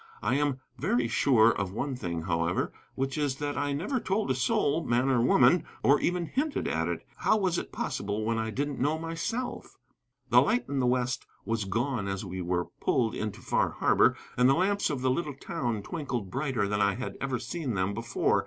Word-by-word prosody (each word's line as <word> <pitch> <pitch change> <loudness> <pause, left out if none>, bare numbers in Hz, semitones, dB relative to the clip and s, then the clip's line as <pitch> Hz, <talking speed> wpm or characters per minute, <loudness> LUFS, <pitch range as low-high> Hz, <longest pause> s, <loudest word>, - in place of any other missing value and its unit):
I - - +1
am 145 -1 +1 0.2
very 120 0 +1
sure 115 -2 +4
of 100 -4 -2
one 135 +5 -2
thing, 85 -8 -4
however, 85 0 0 0.2
which 135 +2 -2
is 145 -3 0
that 145 +1 -3
I 145 0 -1
never 185 - -1
told 200 - 0
a - - +4
soul, 140 +5 +1
man 125 +1 +2
or 125 -3 +3
woman, 125 +7 +5 0.2
or 140 +2 +5
even 175 -1 0
hinted 280 - -1
at - - 0
it. - - -3
How - - +3
was 185 -4 +1
it - - -7
possible 105 +2 -2
when 115 0 0
I 110 0 -1
didn't 140 +5 -2
know 150 +4 +1
myself? 165 +10 -4 0.5
The - - +8
light 240 +3 +1
in 140 -1 -1
the 125 - +2
west 125 0 0 0.2
was 115 -2 -1
gone 115 +2 -1
as 95 +1 -3
we 95 0 -5
were 90 0 0
pulled 115 -4 +1
into 105 -2 -4
Far - - +1
Harbor, - - +3 0.2
and 125 +1 +5
the 135 - +5
lamps 200 +3 +1
of 140 -4 -2
the 130 0 +2
little 150 0 -2
town 120 -5 -3
twinkled 120 - -4
brighter 130 -6 0
than 105 0 0
I 100 0 +3
had 130 - -5
ever 135 -2 -1
seen 130 0 -4
them 95 +1 0
before. 115 +2 +1
130 Hz, 205 wpm, -29 LUFS, 110-145 Hz, 0.5 s, The